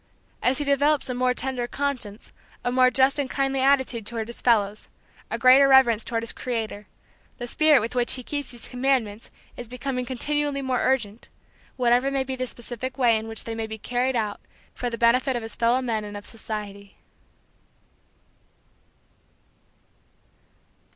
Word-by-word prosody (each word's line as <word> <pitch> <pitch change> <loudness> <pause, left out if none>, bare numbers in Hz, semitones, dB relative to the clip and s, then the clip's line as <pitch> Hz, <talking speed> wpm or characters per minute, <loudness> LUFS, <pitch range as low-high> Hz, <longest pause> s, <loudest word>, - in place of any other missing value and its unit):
As 255 +1 +2
he 290 - -2
develops 280 0 +2
a - - -1
more 250 0 +1
tender 255 -2 -2
conscience, 250 -6 -4 0.3
a 245 - 0
more 255 0 +5
just 265 +2 +2
and 275 -2 -1
kindly 270 0 0
attitude 265 -4 +2
toward 225 +1 -4
his 235 - -6
fellows, 215 -4 +1 0.4
a - - -2
greater 260 +2 +7
reverence 250 -5 +5
toward 230 -1 -2
his 230 - -4
Creator, 220 -4 -4 0.5
the 245 - -5
spirit 300 +2 +4
with 225 - -4
which 245 -1 +2
be 255 - -7
keeps 285 +2 -4
these 240 -2 -9
commandments 245 -5 -1 0.3
is 245 - -7
becoming 250 +1 -3
continually 280 +2 -2
more 260 -1 0
urgent, 235 -4 -1 0.5
whatever 245 +1 +3
may 275 -1 0
be 265 0 -4
the 255 0 -3
specific 245 +2 -6
way 240 -4 +4
in 220 0 -3
which 225 0 -4
they 230 - -5
may 225 0 -4
be 220 0 -6
carried 250 +4 -1
out 215 -3 -2 0.3
for 245 - -3
the 230 - -5
benefit 250 +3 +3
of 240 - -3
his 225 - -4
fellow 240 +3 +2
men 225 -3 -1
and 205 0 -7
of 205 - -9
society. 205 -3 -7
245 Hz, 165 wpm, -24 LUFS, 225-265 Hz, 0.5 s, greater